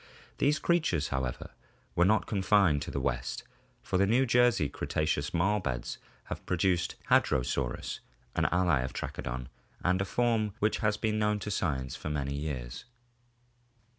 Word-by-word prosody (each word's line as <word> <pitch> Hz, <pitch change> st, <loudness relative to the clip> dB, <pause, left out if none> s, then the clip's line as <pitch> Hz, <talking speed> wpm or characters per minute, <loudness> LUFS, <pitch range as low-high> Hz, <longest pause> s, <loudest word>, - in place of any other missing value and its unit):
These 150 Hz, +2 st, +3 dB
creatures, 155 Hz, -, +1 dB
however, 65 Hz, -2 st, -3 dB, 0.4 s
were 90 Hz, -, +4 dB
not 110 Hz, +3 st, +3 dB
confined 95 Hz, -7 st, +3 dB
to -, -, -5 dB
the -, -, -2 dB
West, 60 Hz, 0 st, -2 dB, 0.4 s
for 90 Hz, -, 0 dB
the 100 Hz, -, +4 dB
New 125 Hz, +5 st, +4 dB
Jersey 120 Hz, -, +4 dB
Cretaceous 75 Hz, 0 st, -1 dB
marl 95 Hz, +5 st, +2 dB
beds 65 Hz, -9 st, -3 dB, 0.2 s
have -, -, -6 dB
produced 90 Hz, -1 st, +1 dB, 0.2 s
Hadrosaurus, 65 Hz, 0 st, +1 dB, 0.4 s
an -, -, +2 dB
ally 90 Hz, -5 st, +3 dB
of 65 Hz, +1 st, -3 dB
Trachodon 65 Hz, +1 st, -4 dB, 0.4 s
and 90 Hz, +1 st, +2 dB
a -, -, 0 dB
form 110 Hz, -2 st, +1 dB
which 105 Hz, +1 st, +1 dB
has 105 Hz, -1 st, +1 dB
been 110 Hz, 0 st, 0 dB
known 105 Hz, 0 st, +2 dB
to 105 Hz, +1 st, -5 dB
science 65 Hz, -9 st, -1 dB
for -, -, -5 dB
many 70 Hz, -2 st, -2 dB
years. 70 Hz, -, -5 dB
90 Hz, 150 wpm, -30 LUFS, 70-105 Hz, 0.4 s, were